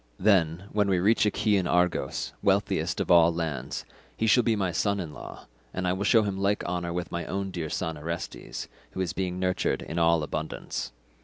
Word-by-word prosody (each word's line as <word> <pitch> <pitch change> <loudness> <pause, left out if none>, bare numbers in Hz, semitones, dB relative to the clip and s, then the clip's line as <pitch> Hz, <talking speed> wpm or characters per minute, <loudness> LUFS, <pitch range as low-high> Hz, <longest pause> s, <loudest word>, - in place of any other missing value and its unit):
Then, 90 -4 +3
when 105 -1 +2
we 95 - +3
reach 105 +4 +3
Achaean 100 -3 +2
Argos, 90 -6 0
wealthiest - - +1
of - - 0
all 85 -1 +7
lands, 80 -6 -3 0.3
he 110 - 0
shall 120 +3 +5
be 115 -1 +2
my 95 -4 0
son 100 +3 0
in 80 -5 -5
law - - -10 0.3
and 90 0 -1
I 90 - +2
will 95 +2 -2
show 110 +1 +5
him 100 -2 -2
like 100 +1 +1
honour 85 -1 -2
with 85 -1 -3
my 85 0 -2
own 95 0 -3
dear 85 -4 -4
son 80 0 -3
Orestes, 85 +3 -5 0.3
who 95 - -3
is 90 -3 -1
being 90 -1 -2
nurtured 90 0 0
in 85 - -3
all 85 -1 +4
abundance. 80 +1 -4
90 Hz, 200 wpm, -27 LUFS, 85-100 Hz, 0.3 s, all